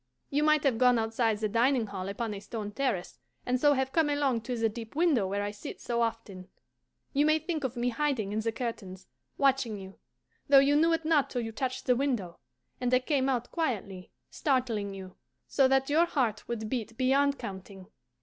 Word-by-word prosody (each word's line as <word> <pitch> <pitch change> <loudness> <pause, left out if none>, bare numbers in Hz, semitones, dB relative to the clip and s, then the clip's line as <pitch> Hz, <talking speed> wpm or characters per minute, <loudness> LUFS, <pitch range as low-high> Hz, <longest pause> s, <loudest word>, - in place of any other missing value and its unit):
You 285 +1 +1
might 305 -1 +3
have 260 -6 +1
gone 250 -1 +5
outside 225 0 0
the 215 0 -1
dining 235 +3 +2
hall 195 -2 -5
upon 215 +2 -3
a 200 - -6
stone 210 +1 -6
terrace, 210 - -2 0.3
and 250 0 0
so 290 -1 +5
have 265 -1 -1
come 320 -1 +2
along 280 -5 +1
to 245 +2 -4
the 225 0 +2
deep 225 +3 -8
window 300 - +2
where 200 +1 -2
I 205 - -2
sit 205 - -9
so 235 -1 -2
often. 225 -5 -3 0.7
You 285 +1 +3
may 310 0 +4
think 315 -1 -4
of 255 -2 -3
me 240 +1 +1
hiding 245 -5 -1
in 215 - -1
the 225 +1 -1
curtains, 205 -6 -6 0.3
watching 270 -6 +2
you, 190 0 -11 0.5
though 280 - +8
you 275 +1 +5
knew 325 +3 +4
it 325 -1 -1
not 295 -4 +3
till 245 - -2
you 225 -1 -4
touched 255 +3 -3
the 250 - +3
window 240 -10 -2 0.4
and 250 -1 -1
I 255 - +6
came 265 +1 0
out 245 -2 -1
quietly, 205 - -3 0.2
startling 235 -8 -1
you, 185 -1 -10 0.3
so 270 -2 +3
that 270 0 +2
your 330 +3 +4
heart 235 -10 -1
would 220 -2 -3
beat 230 -1 -4
beyond 275 +2 +2
counting. 190 0 -8
245 Hz, 205 wpm, -29 LUFS, 215-275 Hz, 0.7 s, though